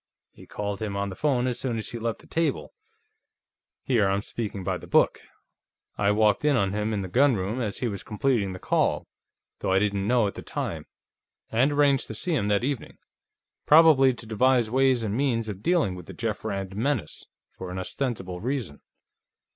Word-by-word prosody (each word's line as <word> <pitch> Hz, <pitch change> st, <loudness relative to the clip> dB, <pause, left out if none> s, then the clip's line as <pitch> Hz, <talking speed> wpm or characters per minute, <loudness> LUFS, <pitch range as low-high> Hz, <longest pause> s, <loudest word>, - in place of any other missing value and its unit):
He -, -, -16 dB
called 100 Hz, -1 st, -4 dB
him 100 Hz, -2 st, -3 dB
on 100 Hz, 0 st, -1 dB
the 95 Hz, -, -7 dB
phone 130 Hz, -1 st, +1 dB
as 125 Hz, -2 st, -1 dB
soon 120 Hz, -4 st, -2 dB
as 110 Hz, -, -4 dB
he 120 Hz, -, -6 dB
left 115 Hz, 0 st, -3 dB
the -, -, -18 dB
table 165 Hz, 0 st, -1 dB, 1.1 s
here 115 Hz, -6 st, +2 dB
I'm 100 Hz, +1 st, 0 dB
speaking 105 Hz, -5 st, -5 dB
by 95 Hz, -1 st, -2 dB
the -, -, -12 dB
book; -, -, +3 dB, 0.7 s
I 100 Hz, -, +1 dB
walked 105 Hz, +1 st, +3 dB
in 150 Hz, -2 st, +3 dB
on 100 Hz, -5 st, +1 dB
him, 105 Hz, +1 st, -1 dB
in 100 Hz, -2 st, -1 dB
the -, -, -4 dB
gunroom, 115 Hz, 0 st, +2 dB
as 105 Hz, -4 st, -3 dB
he 125 Hz, -, +1 dB
was 100 Hz, -4 st, -4 dB
completing 105 Hz, -2 st, 0 dB
the 90 Hz, -, -6 dB
call, -, -, 0 dB, 0.5 s
though -, -, -1 dB
I 95 Hz, -, +4 dB
didn't 100 Hz, 0 st, 0 dB
know 120 Hz, -1 st, +3 dB
it -, -, +1 dB
at -, -, -10 dB
the -, -, -8 dB
time -, -, -5 dB, 0.6 s
and 125 Hz, +6 st, +3 dB
arranged 145 Hz, -2 st, +3 dB
to 110 Hz, -, -6 dB
see 175 Hz, -, -1 dB
him 110 Hz, -10 st, 0 dB
that 105 Hz, +2 st, +1 dB
evening. 135 Hz, -1 st, -3 dB, 0.7 s
Probably 150 Hz, -4 st, +7 dB
to 120 Hz, -, -9 dB
devise 120 Hz, +1 st, +2 dB
ways 130 Hz, -2 st, +3 dB
and 105 Hz, -1 st, -2 dB
means 120 Hz, -4 st, 0 dB
of 100 Hz, -2 st, -6 dB
dealing 165 Hz, -, +2 dB
with 90 Hz, -2 st, -10 dB
the -, -, -8 dB
Jeff 115 Hz, -2 st, -3 dB
Rand 95 Hz, -3 st, -4 dB
menace, 115 Hz, -, -2 dB, 0.3 s
for 95 Hz, -, -7 dB
an 90 Hz, -, -5 dB
ostensible 95 Hz, -3 st, -4 dB
reason. 120 Hz, -, -3 dB
110 Hz, 200 wpm, -26 LUFS, 100-130 Hz, 1.1 s, Probably